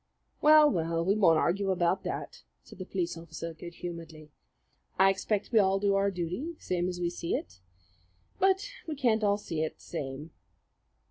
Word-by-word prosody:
"Well, 305 0 +8
well, 165 - 0
we 195 +2 +3
won't 175 -7 +5
argue 195 +5 +1
about 185 0 +1
that," - - -5 0.2
said - - -15
the 185 - -6
police 180 -4 -2
officer 165 0 -7
good 170 +2 -10
humouredly. 165 -3 -8 0.7
"I 195 +1 +6
expect 200 +3 -2
we 225 - +5
all 195 -1 +3
do 200 0 +1
our 195 0 +2
duty 185 - -4
same 180 0 -1
as 180 -1 -5
we 175 -1 -1
see 170 -1 -2
it; 90 +1 -6 0.8
but 385 +2 +3 0.2
we 310 - -3
can't 235 -5 +1
all 205 -1 +3
see 165 -6 -4
it 160 - -2
the - - -21
same." 145 0 -6
180 Hz, 180 wpm, -29 LUFS, 165-205 Hz, 0.8 s, Well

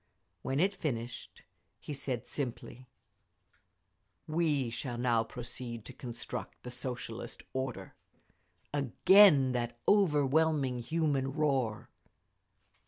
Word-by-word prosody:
When 135 +7 -1
it 195 +4 +3
finished, 120 -5 -5 0.4
he 150 - -6
said 130 -3 -3
simply, 130 -1 -5 1.4
"We 155 -6 0
shall 120 +1 -4
now 120 -2 +2
proceed 120 -1 -6
to 130 - -9
construct 120 -2 -6
the 125 - -7
Socialist 125 -1 -5
order!" 130 -8 -4 0.8
Again 145 - +6
that 120 -1 -2
overwhelming 150 -7 +3
human 140 0 0
roar. 135 -8 0
130 Hz, 95 wpm, -32 LUFS, 120-150 Hz, 1.4 s, Again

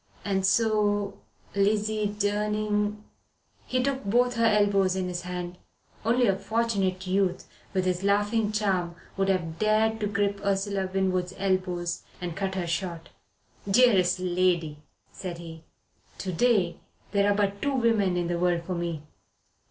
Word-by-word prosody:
"And 190 -2 +1
so 205 -1 +1 0.3
Lizzie 210 +1 +1
Durning 210 0 -1 0.3
" - - -38
He 255 0 +2
took 270 0 -1
both 245 +5 +2
her 230 -1 +3
elbows 200 -3 +3
in 185 -1 -1
his 175 -1 -3
hands 180 0 -5 0.5
only 240 +3 +3
a 195 - +3
Fortunate 195 -2 -1
Youth, 185 -1 0 0.2
with 185 -1 0
his 180 0 0
laughing 205 +2 +2
charm, 190 -5 0 0.2
would 195 0 +1
have 170 -4 -1
dared 220 +1 +2
to 210 - 0
grip 200 -1 -1
Ursula 195 -1 0
Winwood's 185 -1 0
elbows 185 -3 -1 0.2
and 175 -2 -4
cut 195 0 -2
her 185 -2 -1
short. 170 0 -3 0.6
"Dearest 195 -5 +4
lady," 175 -4 +1 0.3
said 180 -3 -6
he, 165 -1 -10 0.5
"to 185 -1 -4
day 205 -4 +2 0.3
there 200 0 +3
are - - +2
but 200 -1 0
two 280 -1 0
women 220 -7 +2
in 175 - 0
the 170 0 -1
world 175 -1 +1
for 185 - -4
me. 170 -3 -3
195 Hz, 150 wpm, -27 LUFS, 180-210 Hz, 0.6 s, Dearest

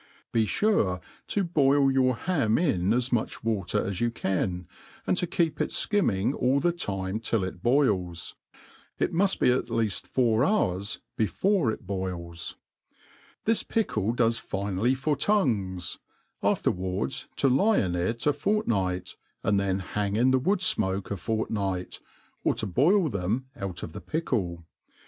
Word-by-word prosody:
Be 110 -2 +2
fure 105 - +2 0.3
to 200 - 0
boil 140 -5 +3
your 130 -1 +3
hani 145 0 +1
In 90 +2 0
as 125 +2 +1
much 115 - -1
water 105 -6 0
as 100 0 -3
you 120 - +3
can, 90 -5 -2 0.4
and - - +2
to 180 - +1
keep 165 -2 0
it - - 0
ikimming 120 - +1
all 135 0 +2
the 175 +4 +2
time 100 - -3
till 115 -2 0
it 90 -1 -5
bolls. 100 - +1 0.6
It - - 0
muft 190 +3 +2
be - - +5
at 125 - 0
leaft 110 -4 -1
four 120 -2 +2
hours 105 - 0 0.2
before 175 - +2
it 110 - -7
boils. 90 -3 -4 0.9
This 225 0 +3
pickle 115 - 0
does 115 -1 +2
finely 100 +6 -1
for 145 +3 0
tongues, 110 - 0 0.4
afterwards 90 -7 -1
to - - +2
lie 195 - +4
In 90 -3 +1
it 90 +7 -1
a 150 - +4
fortnight, 115 - -1 0.3
and 100 -1 +2
then 95 -1 0
hang 100 +2 -2
in 125 +4 +4
the 130 - +4
wood 190 +8 +1
fmoke 95 - 0
a - - 0
fortnight, 100 -2 -2 0.4
or - - +2
to - - -2
|>oil 175 +6 +4
them 110 +3 -2
out 95 -3 -5
of 80 - -6
the - - -7
pickle. 100 - -2
115 Hz, 155 wpm, -27 LUFS, 95-140 Hz, 0.9 s, be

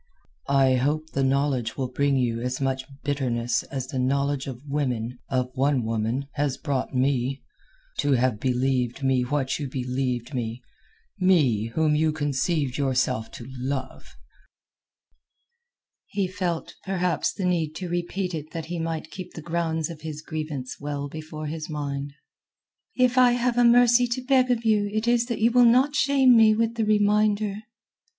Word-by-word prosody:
"I 135 -2 +4
hope 155 +5 -1
the 135 - 0
knowledge 135 -3 0
will 130 -2 -1
bring 140 +2 +1
you 120 -2 0
as 125 +1 -2
much 135 -1 -1 0.2
bitterness 125 -5 0
as 135 -3 -5
the 130 0 -4
knowledge 140 +1 0
of 135 +2 -8
women—of 125 -2 -2
one 135 -1 +2
woman—has 130 +5 -2
brought 140 -3 -2
me. 130 0 0 0.6
To 145 - +2
have 125 -3 +1
believed 130 0 0
me 130 -1 +2
what 135 +2 -1
you 140 -3 -4
believed 125 0 -2
me—me 125 - -1
whom 155 -1 +3
you 155 +1 +2
conceived 145 -1 -1
yourself 130 -4 0
to 120 - -8
love!" 130 +1 -5 1.9
He 200 -2 -1
felt, 180 -3 -3
perhaps 180 -2 0
the 190 - -4
need 165 -4 0
to 180 +2 -5
repeat 175 +2 -2
it 155 -1 -5
that 165 -1 -4
he 170 +1 -4
might 165 -1 -4
keep 185 -2 -8
the 160 - -6
grounds 165 -1 -1
of 160 -2 -10
his 155 -1 -6
grievance 155 -5 -5
well 145 0 -4
before 155 0 -7
his 155 +1 -5
mind. 140 -2 -4 0.8
"If 250 0 +3
I 250 -1 +6
have 245 0 0
a - - +5
mercy 240 +1 +6
to 245 +2 -3
beg 255 -1 +3
of 235 -2 0
you 210 -2 +2
it 215 +2 -1
is 240 0 +3
that 235 -3 -3
you 230 +2 +4
will 245 +1 +6
not 255 +5 +5
shame 270 -3 +5
me 220 -1 +6
with 230 +1 +1
the 225 -2 -1
reminder." 210 -1 +2
145 Hz, 160 wpm, -25 LUFS, 130-185 Hz, 1.9 s, I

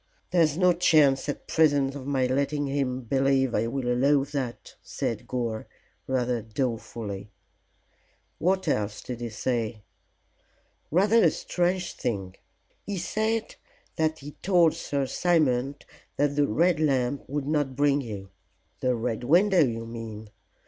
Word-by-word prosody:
"There's 165 -4 +3
no 180 -1 +5
chance 150 -6 +4
at 145 - -4
present 145 -4 +3
of 140 -1 -7
my 135 -2 +1
letting 140 +3 0
him 135 -2 -1
believe 135 +1 +1
I 110 +2 +1
will 125 +1 -3
allow 135 +3 +3
that," 135 -5 -5
said - - -4
Gore, 115 -3 -3 0.4
rather 125 -2 0
dolefully. 110 -3 -4 1.1
"What 190 +2 +1
else 105 0 -1
did 120 -1 -6
he 120 - -3
say?" 115 -1 -2 1.1
"Rather 205 +8 +4
a 165 - +6
strange 180 +3 -1
thing. 95 -6 -3 0.5
He 200 -1 -4
said 220 +5 -1 0.4
that 160 0 0
he 145 +2 -9
told 175 -4 +4
Sir 145 -4 -2
Simon 140 -4 +1 0.4
that 145 0 +1
the 145 -1 +3
Red 170 +8 +2
Lamp 135 -3 0
would 145 0 -2
not 145 -3 0
bring 145 0 +3
you." 100 -6 -7 0.5
"The 125 -1 +1
Red 115 0 -2
Window, 175 +6 +5
you 115 -3 -2
mean. 110 -2 -8
135 Hz, 135 wpm, -27 LUFS, 120-155 Hz, 1.1 s, a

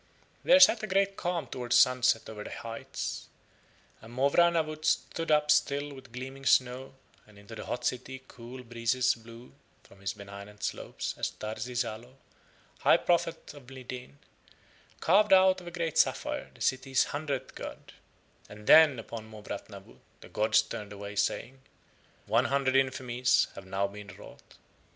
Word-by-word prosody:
There 270 +2 +6
set 235 -4 +7
a 215 - -3
great 195 0 +1
calm 175 -2 -2
towards 125 -1 -2
sunset 125 -3 +4
over 105 -1 -7
the - - -8
heights, 115 0 -6 0.7
and 115 - -13
Mowrah 140 +7 +4
Nawut 155 -2 -2
stood 165 +1 0
up 150 -1 +4
still 145 -1 +1
with 130 -2 -13
gleaming 130 +3 -8
snow, 130 +1 +2 0.3
and 105 -1 -19
into 100 +2 -13
the 110 - -8
hot - - -4
city 130 +1 -3
cool 125 +2 -10
breezes 120 +1 +1
blew 115 +1 -14 0.3
from 100 - -19
his 100 -1 -2
benignant 100 0 -11
slopes - - -4
as - - 0
Tarsi 110 +3 -6
Zalo, 120 +2 -4 0.6
high - - +5
prophet 170 -3 -1
of 140 -4 -14
Mlideen, 125 - -9 0.9
carved 195 +4 +4
out 185 -1 +5
of 175 - -12
a - - -3
great 170 -2 -2
sapphire - - 0
the - - -18
city's 130 0 +2
hundredth 145 -2 -3
god, - - -9 0.6
and 105 0 -12
then 155 -2 +7
upon 115 -1 -8
Mowrah 105 -2 -7
Nawut - - -13 0.2
the - - -13
gods 110 +1 +3
turned 105 -1 -7
away 100 0 -8
saying: 120 +5 -2 0.6
"One 115 +4 +2
hundred 135 0 +1
infamies 130 -1 +2
have 95 -1 -11
now 95 +1 0
been 100 +1 -8
wrought." - - -15
125 Hz, 155 wpm, -29 LUFS, 110-145 Hz, 0.9 s, set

